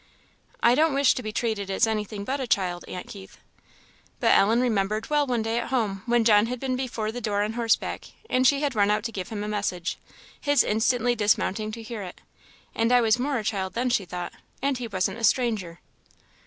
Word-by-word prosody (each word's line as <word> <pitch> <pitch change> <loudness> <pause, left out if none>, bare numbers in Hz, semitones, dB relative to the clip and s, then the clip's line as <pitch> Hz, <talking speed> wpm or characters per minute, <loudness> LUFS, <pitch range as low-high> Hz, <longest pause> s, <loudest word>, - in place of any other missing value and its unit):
"I 235 - +6
don't 305 +2 +3
wish 280 0 +4
to - - -4
be 215 - -5
treated 215 -3 -2
as 195 +4 +3
anything 210 -2 -3
but 270 +7 -2
a 260 - -3
child, 180 -5 0
Aunt 180 - -6
Keith." 195 -1 -11 0.8
But - - +4
Ellen 225 +4 +4
remembered 215 -1 0
well 295 -1 +2
one 240 -3 0
day 225 +1 0
at - - -4
home 215 -7 -1
when 240 -1 +3
John 215 -1 +5
had 250 +1 -4
been 260 0 -1
before 235 -4 -3
the 245 +2 -6
door 205 -2 0
on 215 +1 -2
horseback, 230 -1 0 0.2
and 255 -6 +3
she 280 +1 +3
had 290 -3 0
run 205 -2 +2
out 210 0 +1
to 230 - -3
give 190 -4 -5
him 210 -2 -4
a - - -4
message, 195 -4 -2 0.4
his 285 0 +3
instantly 240 +2 +1
dismounting 215 -1 0
to 225 0 -7
hear 220 -1 -6
it. 180 -2 -8 0.5
"And 230 +1 +1
I 250 - +6
was 225 0 +3
more 275 +1 0
a 220 - -3
child 190 -3 -2
then," 245 +1 0
she 205 -5 +1
thought; 175 0 -6 0.3
"and 275 -1 -1
he 240 - -4
wasn't 195 +1 -2
a - - -8
stranger." 220 -9 +1
225 Hz, 220 wpm, -25 LUFS, 205-245 Hz, 0.8 s, I